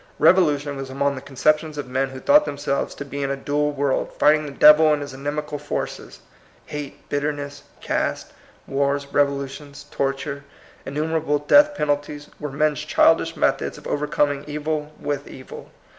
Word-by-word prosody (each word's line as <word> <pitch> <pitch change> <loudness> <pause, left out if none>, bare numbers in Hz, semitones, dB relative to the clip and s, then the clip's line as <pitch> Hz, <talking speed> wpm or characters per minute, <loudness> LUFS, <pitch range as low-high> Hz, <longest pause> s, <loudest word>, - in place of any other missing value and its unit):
Rev 185 - +6
olution 145 -5 +1
was 135 -1 -6
among 140 +1 0
the 130 - -7
conceptions 150 +3 0
of 145 -3 -4
men 130 +1 -1
who 130 0 -8
thought 295 - +5
themselves 140 -1 -2
to 145 - -7
be 140 0 -5
in 135 - -1
a 140 - 0
dual 145 +2 0
world, 140 -2 -1
fighting 150 0 +4
the - - -6
Devil 150 +2 +7
and 150 -1 +1
his 140 -1 -8
inimical 145 +2 -4
forces. 145 - -5 0.4
Hate, 145 -2 -8
bitterness, 145 0 -3 0.2
caste, - - -2 0.3
wars, 140 +1 0
rev 145 0 +5
olutions, 140 +1 -7
torture, 140 +1 -2 0.4
innumerable 150 +1 0
death 290 - +5
pen 150 - -2
alties, 145 0 -2
were 150 - -4
men's 150 +1 +1
childish - - +3
methods - - 0
of - - -14
overcoming 145 -1 0
evil 150 0 -3
with 145 -1 -3
evil. 130 - -11
145 Hz, 165 wpm, -22 LUFS, 140-150 Hz, 0.4 s, Devil